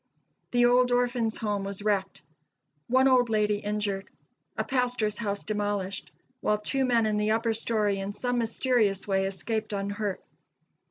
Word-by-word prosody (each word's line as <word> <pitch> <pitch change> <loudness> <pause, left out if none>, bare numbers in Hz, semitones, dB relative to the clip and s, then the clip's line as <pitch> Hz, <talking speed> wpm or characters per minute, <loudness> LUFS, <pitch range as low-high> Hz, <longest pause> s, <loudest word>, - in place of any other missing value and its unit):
The 245 0 +3
old 250 +1 +4
Orphans' 245 -2 +1
Home 205 -2 -2
was 200 0 -5
wrecked; 200 -2 -1 0.6
one 260 +2 +4
old 250 -2 +4
lady 210 -1 +2
injured; 205 -2 -2 0.5
a - - +1
pastor's 245 -5 0
house 200 -3 -2
demolished, 205 -2 -2 0.3
while 210 - +1
two 265 +6 0
men 235 -3 +3
in 215 -1 +1
the 210 0 +1
upper 225 +1 +1
story 215 -3 0
in 195 +1 -3
some 245 +4 -1
mysterious 225 -4 +1
way 195 -1 +1
escaped 215 +2 -3
unhurt. 200 0 -2
215 Hz, 150 wpm, -28 LUFS, 205-240 Hz, 0.6 s, old